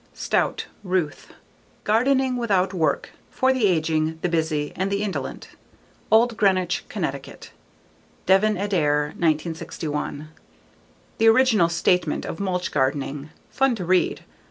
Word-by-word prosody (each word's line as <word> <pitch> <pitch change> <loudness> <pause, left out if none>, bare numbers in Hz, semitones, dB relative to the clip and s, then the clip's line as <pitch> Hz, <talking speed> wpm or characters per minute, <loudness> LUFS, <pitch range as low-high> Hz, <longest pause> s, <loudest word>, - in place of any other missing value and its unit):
Stout, - - -1 0.2
Ruth. 180 -6 -2 0.5
Gardening 260 +4 +2
Without 195 -6 +1
Work: 160 -5 0 0.2
For 260 0 +2
the 250 -5 +2
Aging, 160 -2 0
the 180 - +1
Busy 155 -3 -1
and 190 +2 -1
the 200 +1 -1
Indolent. 200 -3 -5 0.6
Old 230 +1 +4
Greenwich, 185 -3 +1
Connecticut: - - -5 0.7
Devin 205 +3 +3
Adair, 150 -7 +1
1961. 155 -2 -2 0.9
The 225 - +4
original 225 -6 +5
statement 170 -1 +1
of 160 - -6
mulch 185 -2 -2
gardening. 140 +2 -1 0.2
Fun 270 -2 +2
to 185 -5 -5
read. 185 +1 +1
180 Hz, 115 wpm, -23 LUFS, 155-210 Hz, 0.9 s, original